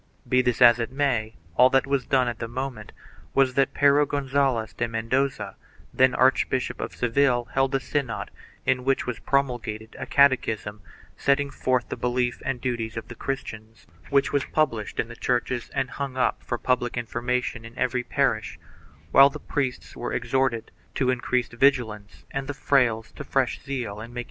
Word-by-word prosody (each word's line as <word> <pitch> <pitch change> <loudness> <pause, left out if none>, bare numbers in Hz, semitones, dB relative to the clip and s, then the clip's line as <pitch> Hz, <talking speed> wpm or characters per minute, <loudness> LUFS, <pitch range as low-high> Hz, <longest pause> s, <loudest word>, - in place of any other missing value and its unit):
2 - - -22
Be 125 - +4
this 125 0 +2
as 120 0 +7
it 115 - -2
may, 125 -6 0 0.2
all 125 +1 +7
that 135 0 +3
was 140 -2 -1
done 130 -2 +3
at 120 -2 -3
the 115 - -3
moment 125 -3 -5 0.4
was 135 -2 +4
that 135 +1 +1
Pero 145 +1 +5
Gonzalez 135 -5 0
de 115 - -1
Mendoza, 120 +4 -1 0.4
then 130 -1 +4
Archbishop 130 0 +2
of - - -5
Seville, 125 0 +2
held 135 0 +2
a - - +2
synod 130 -3 -3 0.3
in 130 -1 +1
which 135 +1 +1
was 125 - -4
promulgated 120 -5 -2
a - - -5
catechism 110 -7 +2 0.4
setting 140 0 +1
forth 130 -2 0
the - - -3
belief 125 0 -1
and 135 -1 -2
duties 115 -3 -3
of 115 0 -6
the - - -6
Christian, 110 -4 -5 0.3
which 140 0 +2
was 145 - +2
published 125 -9 -1
in - - 0
the 120 - -10
churches 125 0 -1
and 130 - -1
hung 140 -2 -5
up 130 - +1
for 120 - -3
public 120 0 0
information 120 0 -2
in 115 +2 -12
every 125 0 0
parish, - - 0 0.5
while 135 +1 +8
the - - -8
priests 135 -4 -3
were - - -4
exhorted 130 -4 0 0.2
to 130 -1 +2
increased 125 -1 -1
vigi 135 +1 +4
lance 105 -2 -12
and 135 0 -3
the 145 - -4
frailes 120 -6 +1
to - - -7
fresh - - -1
zeal 120 -7 -4
in 115 +2 -9
making - - -15
converts. - - -3
125 Hz, 185 wpm, -25 LUFS, 115-135 Hz, 0.5 s, while